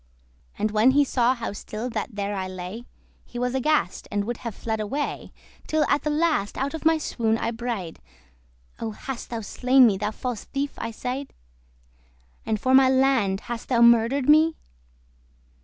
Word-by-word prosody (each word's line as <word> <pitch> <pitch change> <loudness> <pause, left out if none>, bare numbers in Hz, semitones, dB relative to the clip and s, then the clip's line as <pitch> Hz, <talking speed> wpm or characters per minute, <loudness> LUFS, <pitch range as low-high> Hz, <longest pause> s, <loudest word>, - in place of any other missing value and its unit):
And 215 - 0
when 215 +4 +4
he 290 - +6
saw 255 -2 +2
how 230 -4 -5
still 215 +3 -6
that 225 - -4
there 205 0 -2
I 190 -1 -3
lay, 185 +6 -7 0.4
He 245 - -10
was 250 +1 -1
aghast, 265 -6 0
and 205 0 -1
would 240 +1 -3
have 230 -4 -6
fled 220 -1 -3
away, 275 +8 -3 0.4
Till 310 0 +2
at 285 - +2
the 300 - -2
last 300 -9 0
out 275 +3 -2
of 320 - -6
my 320 0 +5
swoon 225 -7 -1
I 230 - -2
braid,* 225 -8 -5 0.8
*woke - - -17
"Oh, 225 - -2
hast 255 +3 -7
thou 230 -2 -4
slain 255 +5 +4
me, 205 -5 +3
thou 210 +1 -1
false 240 +1 -5
thief?" 280 +1 -3
I 230 - -3
said 255 +4 -5 1.1
"And 220 -1 0
for 260 +5 +1
my 260 0 +7
land 260 -7 +3
thus - - -19
hast 240 -1 -6
thou 235 -2 +4
murder'd 235 +3 +4
me? 310 +2 +5
240 Hz, 185 wpm, -25 LUFS, 215-270 Hz, 1.1 s, my